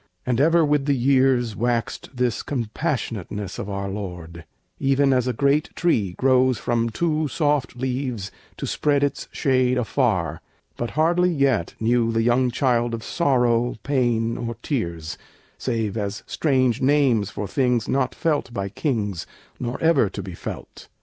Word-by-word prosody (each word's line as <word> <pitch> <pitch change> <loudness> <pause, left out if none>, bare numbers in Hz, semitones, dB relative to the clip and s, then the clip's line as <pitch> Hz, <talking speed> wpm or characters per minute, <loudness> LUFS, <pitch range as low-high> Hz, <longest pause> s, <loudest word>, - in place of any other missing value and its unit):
And 125 0 +1
ever 165 +2 +4
with 145 -1 +1
the 140 - +3
years 130 -3 +2
Waxed 120 +1 -1
this 125 -3 -1
compassionateness 110 - -3
of - - -5
our 100 0 -3
Lord, 90 -4 -7 0.3
Even 135 0 +3
as 125 -1 +1
a - - +2
great 140 +5 +1
tree 105 - +1
grows 130 +1 +3
from 115 -1 0
two 155 +4 0
soft 145 -3 0
leaves 125 -5 -3 0.3
To - - -4
spread 145 -1 +1
its 140 -1 -1
shade 130 -2 +2
afar; 110 - 0 0.3
but 120 - -3
hardly 175 +3 +3
yet 135 - +1
Knew 115 0 +2
the 115 0 +1
young 125 +2 +3
child 120 -2 +1
of 115 - -8
sorrow, 125 -7 +1
pain, 120 -4 +1
or 115 -1 -4
tears, 85 - -3 0.4
Save 115 -5 -1
as 105 -1 -3
strange 130 -6 +1
names 130 -7 +3
for 105 -1 -5
things 125 +1 +1
not 130 -2 0
felt 150 -7 0
by 100 -4 -3
kings, 105 - -2 0.3
Nor 120 0 -3
ever 165 -10 +4
to 100 - -6
be 95 -1 -7
felt. - - -8
125 Hz, 150 wpm, -23 LUFS, 110-140 Hz, 0.4 s, ever